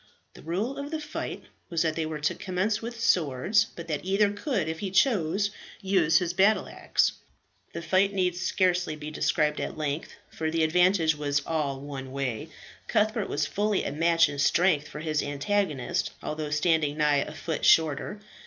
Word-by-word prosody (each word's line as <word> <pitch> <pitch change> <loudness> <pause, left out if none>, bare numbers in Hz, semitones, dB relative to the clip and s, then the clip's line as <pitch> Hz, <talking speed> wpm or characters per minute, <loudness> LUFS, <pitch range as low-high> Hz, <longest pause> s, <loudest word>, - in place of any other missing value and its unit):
The - - -14
rule 200 - -3
of 280 +1 -5
the 315 0 -3
fight 300 - -5 0.3
was 170 -1 +1
that 160 -1 0
they 160 -1 -1
were 155 -1 -4
to 150 - +1
commence 195 +4 -1
with 235 0 -6
Swords, 185 - +2
but 170 -1 -10
that 150 -3 -3
either 200 +2 +2
could, 205 - -2
if 160 0 -4
he 200 - -3
chose, 200 - +2 0.3
use 180 -5 +3
his 175 -2 0
battle 195 +4 +3
axe. - - +1 0.6
The 170 - -5
fight 190 +4 +3
need 185 -3 0
scarcely 180 -2 +1
be 150 0 -7
described 150 0 0
at - - -4
length, 150 0 -3 0.2
for 160 0 -2
the 165 0 +1
advantage 175 0 +3
was 145 -1 -1
all 145 -4 -2
one 135 -2 -7
way. 130 -5 -3 0.4
Cuthbert 215 -1 +1
was 145 0 0
fully 205 +5 0
a - - -3
match 165 +2 +3
in 145 0 -6
strength 155 -1 +3
for 150 - -8
his 155 -2 0
antagonist, 145 -2 -1
although 155 0 -3
standing 150 -1 +1
nigh 150 -2 +3
a 140 - -1
foot 160 +1 -4
shorter. 160 +6 +3
165 Hz, 180 wpm, -27 LUFS, 150-195 Hz, 0.6 s, use